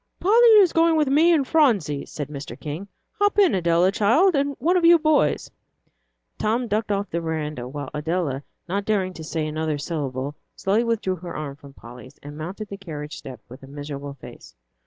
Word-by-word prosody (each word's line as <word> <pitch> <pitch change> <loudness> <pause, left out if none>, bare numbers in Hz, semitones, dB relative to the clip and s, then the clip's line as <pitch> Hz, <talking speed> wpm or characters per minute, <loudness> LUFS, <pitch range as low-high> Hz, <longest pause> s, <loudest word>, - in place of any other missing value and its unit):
"Polly 460 +6 +5
is 380 -5 +5
going 330 0 +4
with 300 -3 +2
me 315 +5 +5
and 290 -6 +2
Phronsie," 205 - +2
said 145 -3 -5
Mr. 145 -1 -8
King. 155 +6 -6 0.3
"Hop 410 0 +2
in, 395 -4 +5
Adela, 175 0 +3
child, 235 - +3
and 280 -1 0
one 335 +8 +1
of 360 - +2
you 340 +1 +8
boys." 310 - +1 0.9
Tom 235 +3 0
ducked 215 0 -1
off 200 0 -2
the 170 - -1
veranda, 150 -6 -4
while 145 0 -6
Adela, 150 -3 -2 0.3
not 200 +3 -2
daring 190 -4 0
to 160 - -9
say 160 0 -3
another 155 0 -2
syllable, 140 -3 -4 0.2
slowly 205 +4 +1
withdrew 220 -5 -1
her 175 +1 -8
arm 145 -2 -5
from 140 -2 -15
Polly's 125 +2 -13
and 145 +1 -9
mounted 185 +7 -6
the 200 - -7
carriage 155 -6 -7
step, 125 -4 -10
with 125 +2 -12
a 135 - -12
miserable 145 0 -7
face. 135 - -13
175 Hz, 190 wpm, -23 LUFS, 145-245 Hz, 0.9 s, you